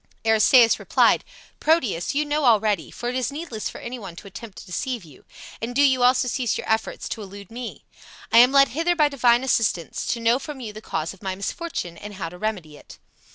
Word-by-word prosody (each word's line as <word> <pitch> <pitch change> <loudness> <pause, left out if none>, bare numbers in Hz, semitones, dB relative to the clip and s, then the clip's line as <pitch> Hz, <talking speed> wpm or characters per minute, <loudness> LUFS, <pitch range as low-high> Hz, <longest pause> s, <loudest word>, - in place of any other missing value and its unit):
Aristaeus 225 +2 +5
replied, - - +3 0.4
"Proteus, 255 - +1
you 300 +1 +1
know 295 +1 -1
already, 215 -6 +2
for 240 - -6
it - - -3
is 255 +1 -1
needless 280 -8 -5
for - - -10
any 245 +1 -7
one 195 -6 -9
to 190 - -12
attempt 200 +1 -10
to - - -10
deceive 235 +4 -4
you. 150 -5 -17 0.4
And 240 +2 -4
do 285 - +4
you 260 -3 +3
also 250 +1 +4
cease 245 -2 -1
your - - -6
efforts 220 0 -1
to 220 - -5
elude 200 0 -11
me. 240 0 -8 0.5
I 230 - +7
am 250 +2 +7
led 275 0 +5
hither 335 +4 0
by 300 -3 +3
divine 245 -3 +3
assistance, 225 -9 0
to 235 - -1
know 230 +2 +2
from 300 -2 -8
you 220 -4 -7
the 215 - -9
cause 160 -5 -3
of 195 - -19
my 190 -2 -3
misfortune 195 - -5
and 205 0 -9
how 180 -4 -4
to 180 +1 -13
remedy 180 -9 -4
it." - - -15
230 Hz, 220 wpm, -23 LUFS, 200-260 Hz, 0.5 s, I